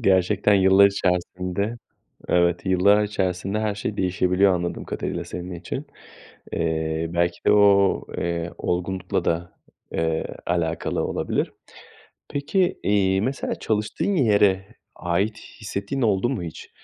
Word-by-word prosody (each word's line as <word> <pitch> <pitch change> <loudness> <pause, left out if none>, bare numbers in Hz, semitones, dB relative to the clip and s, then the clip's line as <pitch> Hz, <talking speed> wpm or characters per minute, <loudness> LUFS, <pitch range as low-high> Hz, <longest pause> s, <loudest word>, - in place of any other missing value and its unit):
Gerçekten 100 0 +3
yıllar 95 +1 +6
içerisinde, 90 +2 -1 0.5
evet, 85 +1 +2
yıllar 95 +3 +4
içerisinde 95 -1 -1
her 110 -1 -1
şey 105 0 -4
değişebiliyor 90 +1 +2
anladığım 85 0 -3
kadarıyla - - -4
senin 90 +1 -7
için. 85 - -6 0.7
Eee, 80 0 -1
belki 85 0 0
de - - +6
o, 100 -1 +5 0.2
eee, 85 0 -2
olgunlukla 90 +1 -2
da, 85 +1 -1 0.4
eee, 80 -1 0 0.2
alakalı 85 -2 -1
olabilir. - - -1 0.8
Peki, 175 +6 0
iii, 95 -1 +2
mesela 130 +5 -2
çalıştığın 110 - -1
yere 100 - +3 0.3
ait 100 +5 -1 0.2
hissettiğin 100 +5 -3
oldu 105 0 +2
mu 110 -10 -3
hiç? 80 -2 -8
95 Hz, 120 wpm, -23 LUFS, 85-105 Hz, 0.8 s, yıllar